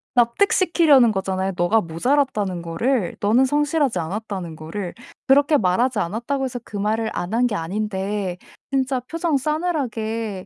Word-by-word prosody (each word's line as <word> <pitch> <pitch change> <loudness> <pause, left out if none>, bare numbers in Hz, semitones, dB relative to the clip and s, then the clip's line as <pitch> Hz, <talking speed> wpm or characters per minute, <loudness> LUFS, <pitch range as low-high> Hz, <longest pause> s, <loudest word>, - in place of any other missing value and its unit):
납득시키려는 295 - +4
거잖아요 190 -1 -1
'너가 200 +5 +3
모자랐다는 200 - 0
거를 180 +5 -1
너는 225 +6 +3
성실하지 290 - +1
않았다.'는 185 -1 -5
거를. 170 +4 -6 0.3
그렇게 285 +3 +5
말하지 220 +4 +1
않았다고 235 +10 -2
해서 250 -1 -4
그 210 - -8
말을 220 +2 0
안 175 +4 -4
한 240 +2 +3
게 230 - -4
아닌데 195 +1 -3 0.3
진짜 265 -1 0
표정 325 +3 -1
싸늘하게 235 - -2
225 Hz, 345 characters per minute, -22 LUFS, 190-270 Hz, 0.3 s, 그렇게